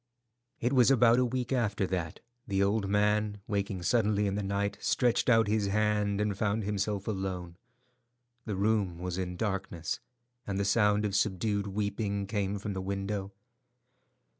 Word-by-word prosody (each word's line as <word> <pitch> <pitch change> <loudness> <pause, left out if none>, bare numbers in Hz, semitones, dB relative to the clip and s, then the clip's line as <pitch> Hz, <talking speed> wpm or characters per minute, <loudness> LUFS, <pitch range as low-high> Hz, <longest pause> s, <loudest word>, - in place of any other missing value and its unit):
It 120 +3 0
was 125 -2 +5
about 120 -2 +5
a 125 - +3
week 125 +1 -2
after 105 -6 +1
that 90 -4 -3 0.3
the 100 0 +1
old 100 0 +1
man, 105 0 +1
waking 100 -3 -2
suddenly 105 -1 +2
in 100 - 0
the 105 - -1
night, 100 +1 -2
stretched 125 0 +2
out 115 -2 +5
his 105 -1 +1
hand 105 0 +1
and 105 -1 0
found 105 +1 0
himself 100 0 -2
alone. 95 -4 -3 0.9
The 105 - -3
room 100 -3 +1
was 90 +1 -4
in 90 -1 -3
darkness, 95 -5 -3 0.5
and 100 -1 -2
the 100 - +1
sound 105 0 +3
of 100 -2 -1
subdued 100 +1 0
weeping 100 0 -2
came 100 -1 -1
from 100 +1 -4
the 95 - -3
window. 100 +1 -3
100 Hz, 160 wpm, -30 LUFS, 95-105 Hz, 0.9 s, was